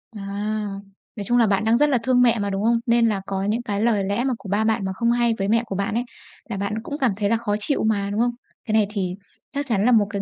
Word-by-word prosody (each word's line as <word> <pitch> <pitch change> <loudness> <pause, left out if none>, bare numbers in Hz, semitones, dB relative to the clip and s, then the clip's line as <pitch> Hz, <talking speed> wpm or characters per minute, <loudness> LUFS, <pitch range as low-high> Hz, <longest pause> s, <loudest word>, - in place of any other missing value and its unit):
À. 205 - -7 0.9
Nói 205 - -5
chung 240 +4 +2
là 230 - +4
bạn 200 +2 +1
đang 225 +1 +4
rất 295 +3 +3
là 270 - +3
thương 255 -1 +3
mẹ 235 -2 +4
mà, 200 0 -1
đúng 195 +1 -2
không? 230 +1 +3
Nên 235 -1 +3
là 205 -3 0
có 195 0 -2
những 215 +4 0
cái 205 -3 -2
lời 220 -4 +2
lẽ 200 +5 -1
mà 265 - 0
của 195 - -10
ba 205 +2 +1
bạn, 220 -2 +1
mà 190 - -2
không 235 +4 +1
hay 240 -1 +2
với 195 - -1
mẹ 230 +2 +2
của 200 - -5
bạn 200 +2 -1
ấy 235 - 0 0.5
là 205 - -3
bạn 200 +2 -2
cũng 290 +3 -5
cảm 255 -5 +3
thấy 205 -2 0
là 230 - +3
khó 210 -3 -1
chịu 280 +7 -1
mà, 205 -2 +1
đúng 210 - -2
không? 240 0 +2 0.3
Cái 215 - -2
này 215 -2 +4
thì 190 -4 -3 0.4
chắc 285 +1 -3
chắn 215 -2 +1
là 250 - +4
1 215 -4 +4
cái 200 0 -3
220 Hz, 300 wpm, -23 LUFS, 200-235 Hz, 0.9 s, là